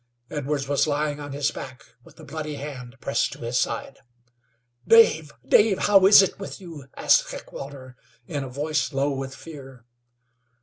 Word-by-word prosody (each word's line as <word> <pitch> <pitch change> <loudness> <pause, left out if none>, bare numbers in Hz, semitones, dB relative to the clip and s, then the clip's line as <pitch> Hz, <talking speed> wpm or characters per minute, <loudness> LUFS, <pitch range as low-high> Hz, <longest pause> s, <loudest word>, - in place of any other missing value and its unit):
Edwards 145 -1 -2
was 140 +2 +1
lying 150 0 -1
on 145 -1 -7
his 145 +1 -1
back, 130 0 -9 0.2
with - - -19
a - - -12
bloody 150 +1 -6
hand 135 -3 -8
pressed 140 - 0
to - - -13
his 120 +1 -1
side. 135 - -3 0.9
"Dave, 160 -10 +5 0.2
Dave, 205 +5 +4
how 195 -2 +6
is 200 0 +9
it 195 - -3
with 195 - -7
you?" 165 -8 -11
asked - - +3
Heckewelder, 135 -2 -9 0.3
in 145 -6 -4
a 130 - -7
voice 145 +2 -2
low 140 +2 0
with 135 0 -5
fear. 135 -7 -12
145 Hz, 165 wpm, -24 LUFS, 135-155 Hz, 0.9 s, is